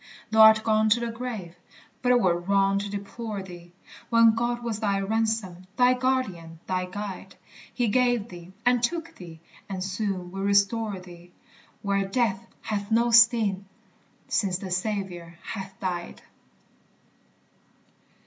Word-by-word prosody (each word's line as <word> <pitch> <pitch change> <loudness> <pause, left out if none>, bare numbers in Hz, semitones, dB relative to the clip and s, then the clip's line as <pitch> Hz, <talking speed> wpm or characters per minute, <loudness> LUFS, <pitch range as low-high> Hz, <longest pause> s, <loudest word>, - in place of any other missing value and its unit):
Thou 220 0 +5
art 220 0 +8
gone 220 -1 +2
to 225 +3 +4
the 235 -1 -3
grave 225 -8 -6 0.5
but 250 - 0
't 250 - +6
were 175 -5 +2
wrong 195 +2 +2
to 200 0 -4
deplore 205 +1 -5
thee, 175 -2 -12 0.4
When 230 -1 +6
God 240 +1 -2
was 225 -3 -3
thy 200 -3 0
ransom, 205 -3 -2
thy 250 0 +5
guardian, 215 -11 -2
thy 185 -1 -1
guide; 195 +1 -7 0.4
He 245 -2 0
gave 245 -1 +2
thee, 175 0 -11
and 245 -1 +3
took 330 +7 -2
thee, 165 -3 -11 0.3
and 190 -2 -4
soon 190 -2 -3
will 195 +1 -5
restore 200 +1 +1
thee, 175 -1 -14 0.5
Where 200 -1 +1
death 195 -2 -1 0.2
hath 205 -1 -3
no 235 +1 +2
sting, 225 -4 +5 0.6
since 190 -3 0
the 190 -1 -7
Saviour 185 -3 -3
hath 195 -2 -7
died. 175 -2 -4
200 Hz, 140 wpm, -26 LUFS, 185-230 Hz, 0.6 s, art